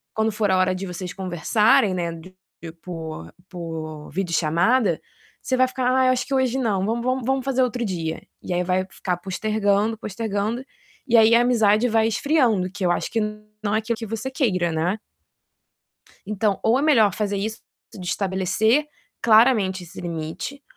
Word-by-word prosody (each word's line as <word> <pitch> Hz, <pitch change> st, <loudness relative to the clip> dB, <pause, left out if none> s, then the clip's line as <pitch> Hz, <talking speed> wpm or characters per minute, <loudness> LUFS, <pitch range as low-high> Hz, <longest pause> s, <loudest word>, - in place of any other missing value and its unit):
quando 220 Hz, 0 st, +1 dB
for 210 Hz, -2 st, +1 dB
a 185 Hz, -, +3 dB
hora 185 Hz, 0 st, +2 dB
de 190 Hz, +1 st, -5 dB
vocês 180 Hz, 0 st, -6 dB
conversarem, 190 Hz, +3 st, +2 dB
né, 175 Hz, -2 st, -2 dB
de 185 Hz, +3 st, -12 dB, 0.5 s
por 160 Hz, -, -7 dB, 0.2 s
por 160 Hz, -3 st, -7 dB
videochamada, 175 Hz, -, +1 dB, 0.4 s
você 260 Hz, -, -1 dB
vai 255 Hz, 0 st, +4 dB
ficar: 255 Hz, 0 st, -3 dB
"Ah, 260 Hz, 0 st, +3 dB
acho 250 Hz, 0 st, 0 dB
que 275 Hz, -, -5 dB
hoje 260 Hz, -1 st, +1 dB
não, 205 Hz, -7 st, 0 dB
vamos 235 Hz, +2 st, -2 dB
vamos 255 Hz, -1 st, 0 dB
vamos 265 Hz, +1 st, 0 dB
fazer 265 Hz, -1 st, +1 dB
outro 245 Hz, 0 st, -1 dB
dia." 165 Hz, -5 st, -3 dB, 0.2 s
E -, -, -4 dB
aí 180 Hz, 0 st, +1 dB
vai 185 Hz, +1 st, 0 dB
ficar 180 Hz, -2 st, -3 dB
postergando, 205 Hz, +3 st, 0 dB
postergando, 215 Hz, +3 st, -3 dB, 0.4 s
e 240 Hz, -2 st, +4 dB
aí 225 Hz, +1 st, +6 dB
a 235 Hz, -, +5 dB
amizade 225 Hz, -2 st, +3 dB
vai 225 Hz, 0 st, +3 dB
esfriando, 225 Hz, -, +1 dB
que 195 Hz, -1 st, -3 dB
eu 175 Hz, -, +3 dB
acho -, -, -2 dB
que 225 Hz, -, 0 dB, 0.4 s
não 205 Hz, 0 st, 0 dB
é -, -, +3 dB
aquilo 225 Hz, +1 st, -3 dB
que 225 Hz, -, -5 dB
você 225 Hz, +5 st, -4 dB
queira, 185 Hz, -, 0 dB
né? 175 Hz, +7 st, -1 dB, 1.3 s
Então 210 Hz, -1 st, 0 dB
ou 230 Hz, +3 st, +3 dB
é -, -, 0 dB
melhor 225 Hz, -, +4 dB
fazer 205 Hz, -2 st, -1 dB
isso, 220 Hz, +3 st, -3 dB, 0.3 s
de 185 Hz, -3 st, -8 dB
estabelecer 195 Hz, -, +1 dB, 0.4 s
claramente 215 Hz, -5 st, +4 dB
esse 170 Hz, -, -11 dB
limite, 170 Hz, -, -5 dB
210 Hz, 175 wpm, -23 LUFS, 185-235 Hz, 1.3 s, aí